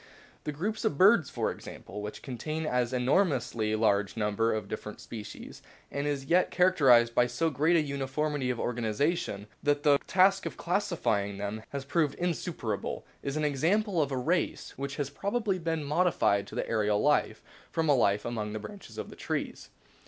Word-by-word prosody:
The 150 - -1
group 205 +9 -3
of 145 - 0
birds, 190 - +6
for - - -1
example, 105 - -9
which 105 0 -7
contains 130 -1 -2
an 125 -1 0
enormously 125 - +1
large 105 -1 +1
number 105 +1 +1
of 110 -2 -2
different 105 0 -6
species, 110 -2 -9 0.3
and 140 +1 -2
is 140 -2 -2
yet 180 +5 +3
characterised 135 -11 +5
by 125 +1 +4
so 140 +7 0
great 155 +5 +2
a 165 - +5
uniformity 140 0 -2
of 125 -2 -1
organisation 120 - -1 0.2
that 145 0 +1
the 145 -2 +5
task 195 +1 +4
of - - -7
classify 170 - 0
ing 100 -1 -7
them 100 +2 -4
has 140 -1 -5
proved 145 -1 +1
insuperable, 175 -2 -3 0.2
is 140 +2 -3
an 155 - 0
example 175 - +1
of 140 -2 -1
a 130 - -1
race 165 +7 -1
which 140 +1 -4
has 140 -2 -3
probably 200 +3 -1
been 165 -2 -2
modified 145 - +2
to - - -10
the - - -2
aerial 105 -2 +1
life - - +1 0.3
from 165 -1 -1
a 145 - +5
life 105 -6 +2
among 110 -3 -3
the 110 - -3
branches 200 - -10
of - - -6
trees. - - -4
140 Hz, 175 wpm, -29 LUFS, 115-165 Hz, 0.3 s, birds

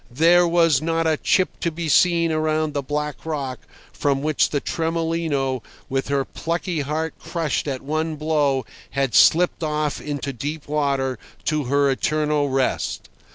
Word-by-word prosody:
There 170 +7 +4
was 165 -4 +3
not 165 +1 0
a 160 -1 +3
chip 185 +4 +1
to 170 - 0
be 165 0 -4
seen 170 +1 +4
around 155 -1 0
the 145 - -1
black 150 +1 -3
rock 140 -5 -3 0.3
from 140 -1 0
which 155 -1 +2
the 145 - 0
Tremolino, 160 -5 -1 0.3
with 135 0 -1
her 140 -1 0
plucky 170 0 -3
heart 155 +3 -2
crushed 160 -4 -2
at 135 -2 -3
one 155 +2 -1
blow, 145 -4 +1 0.2
had 135 -3 -1
slipped 175 - +5
off 150 -2 -1
into 145 -1 -4
deep 145 +5 -5
water 140 -4 0 0.3
to 155 -3 0
her 140 +2 +2
eternal 150 +1 0
rest. 135 -1 -1
150 Hz, 155 wpm, -22 LUFS, 140-160 Hz, 0.3 s, slipped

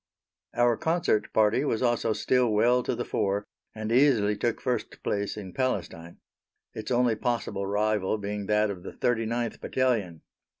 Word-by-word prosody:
Our 120 -1 +3
Concert 160 -10 0
Party 110 +4 +3
was 130 -5 0
also 120 -2 +1
still 125 +2 +2
well 120 +4 +3
to - - -2
the - - -3
fore, 100 +1 -1 0.3
and 110 0 -4
easily 120 -5 +4
took 115 +2 -1
first 125 -3 -3
place 100 +1 -2
in 95 -3 -7
Palestine 85 -9 -3 0.6
its 110 - -6
only 125 -2 +3
possible 110 -4 -2
rival 105 0 0
being 100 -1 -4
that 105 0 +2
of 90 -3 -8
the - - -8
39th 115 -1 -1
Battalion. 110 -11 -1
110 Hz, 155 wpm, -27 LUFS, 105-120 Hz, 0.6 s, easily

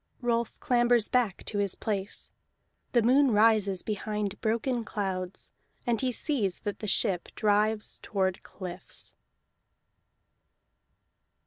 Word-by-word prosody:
Rolf 235 -2 -1
clambers 240 -2 +3
back 240 -7 +1
to 205 - -2
his 200 -2 +1
place. 200 -2 -2 0.6
The 240 -2 +4
moon 265 +4 +5
rises 210 -4 +4
behind 210 -1 -3
broken 235 +2 0
clouds, 190 -4 -4 0.3
and 235 -2 +1
he 260 -1 +1
sees 230 - 0
that 205 - -4
the 215 - -4
ship 190 -4 0
drives 210 0 +1
toward 190 -2 -1
cliffs. 180 -2 -7
215 Hz, 110 wpm, -29 LUFS, 195-235 Hz, 0.6 s, moon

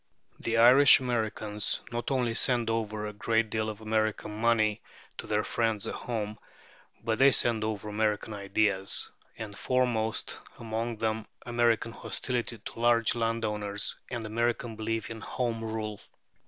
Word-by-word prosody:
The 115 0 -1
Irish 125 +5 +8
Americans 110 -4 -1
not 120 0 -3
only 125 -4 +1
send 120 -1 +3
over 110 -1 -2
a 105 - -5
great 110 +1 0
deal 110 -1 -1
of 110 0 -7
American 110 -1 -1
money 110 -1 +2 0.4
to - - -5
their 105 0 +1
friends 115 -3 -1
at - - -3
home, 110 -3 -4 0.6
but 110 -1 -1
they 135 +1 +7
send 115 -4 +3
over 110 -1 -3
American 105 0 -1
ideas, 100 -1 +1 0.3
and 105 -2 -7
foremost 120 -3 0 0.2
among 115 +1 -3
them 110 0 -2 0.2
American 120 -2 +1
hostility 120 0 -3
to 110 - -9
large 115 -1 +3
landowners, 105 -3 -1
and 120 -2 -4
American 115 +1 -1
belief 110 +1 -3
in 110 -1 -6
Home 115 -3 -2
Rule. 110 -2 -4
110 Hz, 140 wpm, -29 LUFS, 110-115 Hz, 0.6 s, Irish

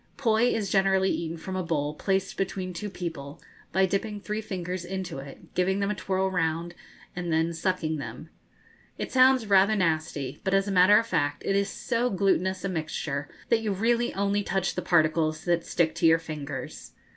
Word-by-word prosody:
Poi 230 -4 +3
is 200 -4 -2
generally 190 -1 +3
eaten 165 0 -3
from 185 +3 -6
a 185 - 0
bowl 150 -4 -1
placed 195 +4 -1
between 185 -1 -3
two 205 +5 -5
people, 160 -7 -6 0.3
by 190 +2 +3
dipping 205 +2 -2
three 210 +1 -3
fingers 180 -3 -4
into 180 -4 -5
it, 135 0 -12
giving 190 +2 +1
them 200 +1 0
a - - -2
twirl 190 0 -1
round, 165 -1 -1 0.4
and 175 -1 -3
then 160 +1 +1
sucking 165 -2 -1
them. 155 +3 -8 0.7
It - - -4
sounds 260 -2 +5
rather 200 +1 +4
nasty; 155 -7 -1
but, 190 0 +1
as 195 +1 +2
a - - -1
matter 190 +2 +6
of 225 - +2
fact, 145 -8 -1
it 195 - +1
is 200 0 +1
so 235 +4 -1
glutinous 190 -1 +1
a - - 0
mixture 155 -4 -3 0.2
that 225 - +3
you 215 -2 -1
really 235 +4 +1
only 200 +1 +1
touch 190 -2 -1
the 180 - -3
particles 160 -2 +2
that 170 -1 +1
stick 165 -2 +1
to 165 0 +2
your 165 0 +6
fingers. 155 -3 -7
185 Hz, 190 wpm, -27 LUFS, 165-200 Hz, 0.7 s, matter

